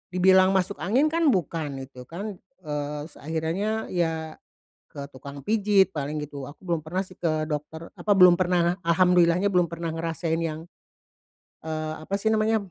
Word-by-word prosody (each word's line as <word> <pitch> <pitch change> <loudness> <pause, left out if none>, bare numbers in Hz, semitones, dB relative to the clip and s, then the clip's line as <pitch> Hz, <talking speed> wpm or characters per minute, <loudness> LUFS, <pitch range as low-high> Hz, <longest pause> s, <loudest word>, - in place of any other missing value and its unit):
dibilang 190 +1 +5
masuk 190 +2 0
angin 260 - +2
kan 330 -1 +2
bukan 155 - -1
gitu 130 -1 -13
kan, 195 +3 -6 0.3
eee, 150 0 -3
s - - -21
akhirannya 170 +8 -2
ya, 160 -2 -1 0.6
ke 140 -1 -7
tukang 140 +1 -10
pijit 205 -3 +3
paling 150 +1 -3
gitu 145 -2 -7
aku 175 +6 -15
belum 170 -2 0
pernah 175 +4 -3
sih 185 -1 -5
ke 155 -2 -1
dokter 155 +2 -5
apa 210 - -2
belum 180 -3 +7
pernah 175 -1 +2
alhamdulillah-nya 175 +2 +4
belum 180 -2 +3
pernah 170 0 -4
ngerasain 165 0 -2
yang, 160 0 -4 1.0
eee, 155 -1 -3
apa 195 - -8
sih 220 - -2
namanya 220 +1 +2
170 Hz, 160 wpm, -25 LUFS, 155-190 Hz, 1.0 s, belum